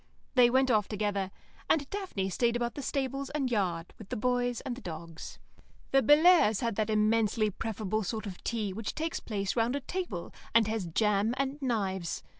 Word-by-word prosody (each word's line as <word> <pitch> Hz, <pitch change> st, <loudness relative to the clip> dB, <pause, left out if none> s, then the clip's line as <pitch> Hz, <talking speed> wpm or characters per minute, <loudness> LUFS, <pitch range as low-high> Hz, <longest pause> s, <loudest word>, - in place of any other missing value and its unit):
They 250 Hz, -3 st, +6 dB
went 260 Hz, +1 st, +3 dB
off 210 Hz, -3 st, +3 dB
together, 205 Hz, -2 st, -1 dB, 0.4 s
and 290 Hz, -3 st, +2 dB
Daphne 360 Hz, -, -3 dB
stayed 235 Hz, +5 st, +1 dB
about 240 Hz, 0 st, -1 dB
the 285 Hz, -, -6 dB
stables 275 Hz, 0 st, -2 dB
and 275 Hz, -4 st, -1 dB
yard 180 Hz, -6 st, -1 dB
with 215 Hz, -, -11 dB
the -, -, -2 dB
boys 245 Hz, +1 st, 0 dB
and 255 Hz, -2 st, -4 dB
the 260 Hz, -, -10 dB
dogs. 165 Hz, -2 st, -8 dB, 0.5 s
The 270 Hz, -, +5 dB
Bellairs' 295 Hz, -, +6 dB
had 230 Hz, -3 st, -1 dB
that 215 Hz, 0 st, 0 dB
immensely 215 Hz, 0 st, +2 dB
preferable 215 Hz, 0 st, -2 dB
sort 220 Hz, +2 st, -3 dB
of 190 Hz, -3 st, -8 dB
tea 215 Hz, -5 st, -2 dB
which 215 Hz, +1 st, -4 dB
takes 325 Hz, +1 st, -2 dB
place 200 Hz, -3 st, -3 dB
round 235 Hz, +2 st, +1 dB
a -, -, 0 dB
table, 280 Hz, -, -5 dB, 0.2 s
and 230 Hz, -2 st, +6 dB
has 215 Hz, -4 st, -2 dB
jam 210 Hz, +5 st, +1 dB
and 275 Hz, +2 st, -2 dB
knives. 195 Hz, -9 st, -1 dB
225 Hz, 185 wpm, -30 LUFS, 200-260 Hz, 0.5 s, They